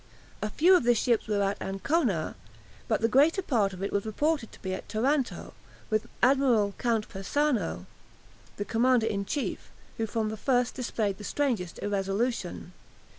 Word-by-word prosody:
A 215 - -1
few 350 - +5
of 355 - +3
the 240 0 +4
ships 235 0 +1
were 205 -2 +1
at 195 +1 -1
Ancona, 195 - 0 0.5
but - - +1
the 225 - +4
greater 295 - +4
part 220 - +1
of 185 0 -7
it 200 - -2
was 200 - +1
reported 280 +3 -1
to - - -16
be 190 -1 -2
at 185 - -7
Taranto, 260 +5 -1 0.4
with 215 0 +1 0.2
Admiral 245 -6 +4
Count 230 -3 0
Persano, 195 - -1 0.7
the 205 - -3
commander 240 +1 +3
in 200 -3 -1
chief, 280 +7 -3 0.3
who 225 - -1
from 220 0 -1
the 220 - -5
first 245 +1 +1
displayed 220 -6 -2
the - - -8
strangest 220 -9 -1
irresolution. 195 -1 -2
225 Hz, 165 wpm, -28 LUFS, 200-260 Hz, 0.7 s, few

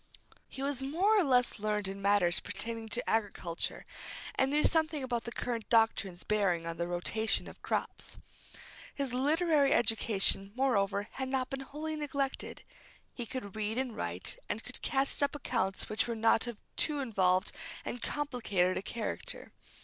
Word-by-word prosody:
He 270 - -6
was 275 -1 +1
more 345 +11 +3
or - - +4
less 250 -6 +3
learned 210 -1 0
in 195 +1 -5
matters 200 -3 +4
pertaining 230 -1 -4
to 245 +3 -2
agriculture, 200 -6 -1 0.5
and 265 - +2
knew 295 +2 +3
something 315 -3 +3
about 240 -2 -2
the 235 - -4
current 235 -2 -3
doctrines 225 -5 +3
bearing 195 -6 +1
on 165 0 -4
the 170 +1 -1
rotation 190 +5 +1
of - - -12
crops. - - -2 0.8
His 275 -3 -2
literary 295 +1 +4
education, 210 -3 +2
moreover, 205 -6 +2
had 265 0 -4
not 260 -1 -1
been 270 - -2
wholly 300 +3 -4
neglected. 280 -3 -3 0.5
He 240 -2 -5
could 215 -6 -5
read 215 +1 -1
and 255 -3 -1
write, 485 - -1
and - - -2
could - - -10
cast 275 +2 +1
up 285 +1 +2
accounts 230 -9 -1
which 215 +2 0
were 235 - -2
not 225 +1 +3
of 240 -3 -5 0.2
too 300 -2 +1
involved 190 -8 +2 0.3
and 245 - -4
complicated 225 -11 0
a - - -1
character. 220 +2 -5
235 Hz, 160 wpm, -32 LUFS, 205-270 Hz, 0.8 s, or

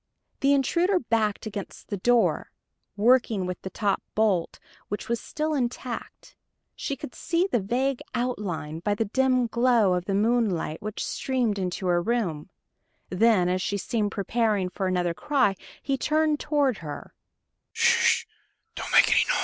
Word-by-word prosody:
The 275 - +3
intruder 340 +8 +2
backed 225 -5 -1
against 200 -2 -7
the 205 - -2
door, 240 +5 +2 0.5
working 225 -3 +3
with 180 -1 -5
the 190 - -6
top 200 0 -1
bolt, 205 -6 +1 0.3
which 205 - -5
was 235 0 -1
still 310 0 -3
intact. 250 -3 -4 0.4
She 280 - -3
could 250 - -8
see 345 +1 0
the 240 - +2
vague 250 +6 -1
outline 200 -11 -3
by 205 +4 0
the 225 - 0
dim 255 +3 +2
glow 235 -4 +3
of 180 -1 -1
the 195 - -1
moonlight 210 -7 +1
which 215 0 -4
streamed 245 -6 -1
into 185 0 -3
her 175 -1 +2
room. 190 -8 -2 0.6
Then, 185 -1 +3
as 185 +1 0
she 200 - -1
seemed 210 0 -1
preparing 210 -2 0
for 190 +1 -3
another 180 -2 0
cry, 260 -3 +1 0.3
he 270 -1 -1
turned 305 -1 +1
toward 285 -6 +1
her. 150 -3 -8
220 Hz, 140 wpm, -26 LUFS, 190-255 Hz, 0.6 s, The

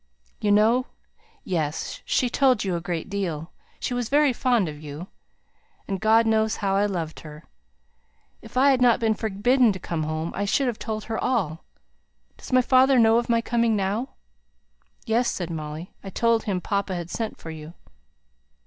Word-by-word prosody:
"You 210 - +1
know 225 +5 +4 0.6
Yes! 155 -5 -3
she 255 - +1
told 255 -2 +2
you 190 -3 -1
a 170 - -3
great 170 -1 -4
deal 175 -6 -4 0.3
she - - -3
was 245 -2 -2
very 290 -1 +4
fond 240 -6 +1
of 150 -1 -8
you. 150 +3 -7 0.8
And 195 -1 -3
God 220 +1 +4
knows 220 -1 +2
how 195 -2 -1
I 205 +1 +2
loved 170 -5 -4
her. 150 0 -11 1.0
If - - -9
I 275 +2 +6
had 260 -2 +1
not 240 -2 +5
been 225 -2 +2
forbidden 220 +4 +2
to 190 - -7
come 170 -2 -3
home, 155 +1 -3
I 200 - -1
should 270 +7 +1
have 240 -3 -2
told 215 -2 -4
her 225 0 -4
all. 190 -11 -1 0.7
Does - - -12
my 255 0 +4
father 260 +1 +5
know 225 -1 +5
of 240 - -5
my 230 0 +3
coming 230 -1 +1
now?" 205 +6 -2 0.9
"Yes," 235 +1 +1
said 175 -2 -4
Molly; 155 +2 -6
"I 195 - -6
told 230 +3 +1
him 190 -3 -1
papa 200 0 -2
had 175 -1 -6
sent 225 -2 -4
for 165 - -8
you." 160 +1 -10
210 Hz, 180 wpm, -24 LUFS, 175-235 Hz, 1.0 s, I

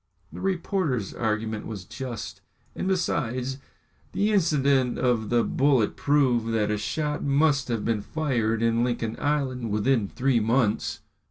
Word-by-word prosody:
The - - -7
reporter's 175 - -1
argument 110 -1 -2
was 100 -5 -7
just, 125 -2 -6 0.3
and - - -3
besides, 130 -8 -1 0.5
the 205 +2 +1
incident 140 - +2
of 120 -4 +1
the 120 -1 +3
bullet 135 -6 +2
proved 125 -6 +2
that 105 -1 +1
a 105 - 0
shot 150 +8 -2
must 140 -1 +2
have 115 -3 -2
been 115 -2 0
fired 115 -6 -1
in 115 0 +2
Lincoln 120 -2 -1
Island 130 -5 -1
within 105 +1 +1
three 130 +2 +1
months. 115 0 0
125 Hz, 140 wpm, -26 LUFS, 115-145 Hz, 0.5 s, the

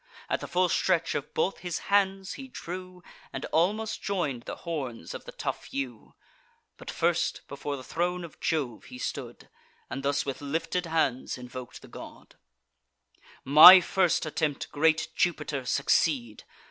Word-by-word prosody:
At - - +1
the - - -7
full 180 +1 +2
stretch 170 -1 +1
of 145 - -4
both 195 - 0
his 175 -3 -3 0.2
hands 195 -1 +2
he 270 - -9
drew, 185 -5 -8 0.3
And 135 - -5
almost 210 +7 0
join'd 155 -12 -2
the - - -5
horns 130 - -5
of - - -8
the - - -8
tough - - -5
yew. 130 -5 -5 0.6
But, - - -10
first, 170 0 0
before 140 0 -5
the 130 - -9
throne 175 +5 -2
of 170 - -11
Jove 140 -8 -2
he 255 - -10
stood, 130 - -6 0.4
And 135 - -4
thus 140 +1 0
with 135 - -4
lifted 165 +4 -2
hands 160 -7 0
invok'd 125 0 -9
the - - -12
god: - - -12 1.1
"My 155 +7 +11
first 180 -1 +1
attempt, 150 -1 -2
great 160 +2 +2
Jupiter, 150 -6 -1
succeed! 135 -5 +1
160 Hz, 150 wpm, -28 LUFS, 135-180 Hz, 1.1 s, My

